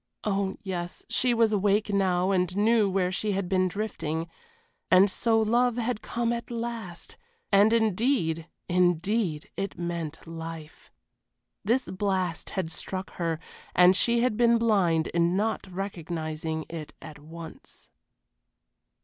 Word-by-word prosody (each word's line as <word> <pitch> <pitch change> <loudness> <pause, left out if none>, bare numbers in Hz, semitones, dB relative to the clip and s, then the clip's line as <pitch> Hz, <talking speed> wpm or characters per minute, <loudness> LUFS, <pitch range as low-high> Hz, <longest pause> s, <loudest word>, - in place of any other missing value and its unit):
Oh 195 -2 -1
yes, 175 -3 -5
she 255 - +2
was 230 -2 +3
awake 205 +1 +2
now 185 -1 +2
and 180 0 0
knew 215 0 +4
where 185 -1 +1
she 205 +3 -1
had 195 -1 -1
been 185 0 +2
drifting. 165 -5 -3 0.6
And 185 +2 +6
so 225 +1 +2
love 240 +2 +2
had 235 -2 -1
come 235 0 -1
at 235 0 -5
last, 230 -7 -5 0.3
and 205 +2 +6
indeed, 215 - +1 0.2
indeed 175 -1 +1
it 195 0 -4
meant 170 -3 -4
life. 165 -1 -8 0.7
This 240 +5 +1
blast 185 -3 -1
had 170 -4 -1
struck 190 +3 -5
her, 165 -2 -1 0.4
and 180 +1 +7
she 235 +3 +3
had 245 -4 +1
been 235 -1 +5
blind 190 -8 +2
in 170 +2 +1
not 220 0 -1
recognizing 160 -4 -4
it 160 -3 -7
at 150 -1 -11
once. 160 +2 -11
190 Hz, 130 wpm, -27 LUFS, 170-220 Hz, 0.7 s, and